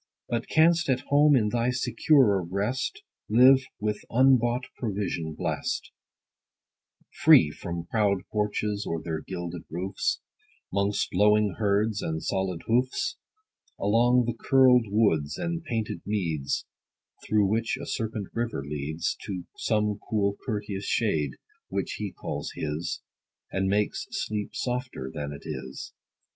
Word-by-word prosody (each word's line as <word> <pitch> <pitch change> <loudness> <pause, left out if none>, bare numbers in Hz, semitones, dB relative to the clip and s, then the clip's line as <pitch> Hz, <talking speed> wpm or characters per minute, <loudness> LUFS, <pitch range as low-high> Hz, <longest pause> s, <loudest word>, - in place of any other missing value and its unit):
But 115 -1 -2
canst 165 0 +4
at 130 -1 +2
home, 145 +1 +6
in 110 -5 +3
thy 120 +2 +1
securer 125 - +3
rest, 110 - -2 0.3
Live, 130 +4 +7 0.2
with 105 0 -2
unbought 125 0 +4
provision 95 -8 -3
blest; - - -2 1.3
Free 75 - +7
from 85 +1 -5
proud 100 -1 +1
porches, 105 0 -1
or 85 - -1
their 80 -2 -3
gilded 85 -1 -5
roofs, 90 +4 -2 0.5
'Mongst 100 +1 0
lowing 105 0 +3
herds, 105 0 +1
and 80 0 -3
solid 95 -3 -2
hoofs: 130 - 0 0.6
Along 120 +4 +3
the 120 - -1
curled 125 -1 +4
woods, 100 -9 +2
and 170 -1 -3
painted 115 -8 -3
meads, 85 -9 -1 0.6
Through 105 -1 +2
which 115 +4 0
a - - -6
serpent 110 -3 -3
river 115 -11 -2
leads 75 +4 -2
To 95 -3 -4
some 105 -2 0
cool 100 -2 +1
courteous 105 -4 -3
shade, 75 - +1 0.4
which - - -3
he - - -3
calls - - -5
his, 75 +3 -3 0.5
10 95 - -1
And 95 - +1
makes 105 +1 0
sleep 105 -1 -3
softer 125 - -3
than 75 -1 -4
it 70 - -9
is. 65 +1 -6
105 Hz, 130 wpm, -27 LUFS, 90-120 Hz, 1.3 s, Live